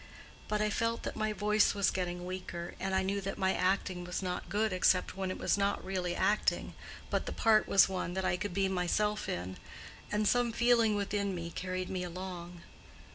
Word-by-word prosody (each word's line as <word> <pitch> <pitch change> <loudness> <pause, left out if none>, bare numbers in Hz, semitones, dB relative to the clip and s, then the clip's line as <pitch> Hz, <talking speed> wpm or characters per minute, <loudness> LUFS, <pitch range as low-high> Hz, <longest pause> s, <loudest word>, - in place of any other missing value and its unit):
But 210 0 0
I 210 - +1
felt 230 +2 -1
that - - -4
my 215 0 0
voice 210 +1 +2
was 200 -2 +2
getting 180 -1 -3
weaker, 180 -2 -5
and 190 0 -1
I 190 - +2
knew 200 +1 -1
that 195 +1 -4
my 190 0 +2
acting 185 -1 0
was 180 +2 -4
not 180 -1 -3
good 215 0 +1
except 185 0 +3
when 190 -1 -2
it 185 - -3
was - - +1
not 200 0 0
really 180 -2 -2
acting, 210 +1 +1 0.4
but - - 0
the - - -2
part 220 -1 +3
was 195 - +6
one 185 -2 -3
that 190 0 -1
I - - +2
could 190 +2 -3
be 195 -1 +2
myself 190 +3 0
in, 90 +2 -4 0.5
and 210 0 +1
some 245 0 +3
feeling 235 -2 +4
within 200 -1 -1
me 170 -1 -5
carried 185 +1 -4
me 185 -1 -2
along. 175 -1 -7
190 Hz, 200 wpm, -32 LUFS, 180-210 Hz, 0.5 s, was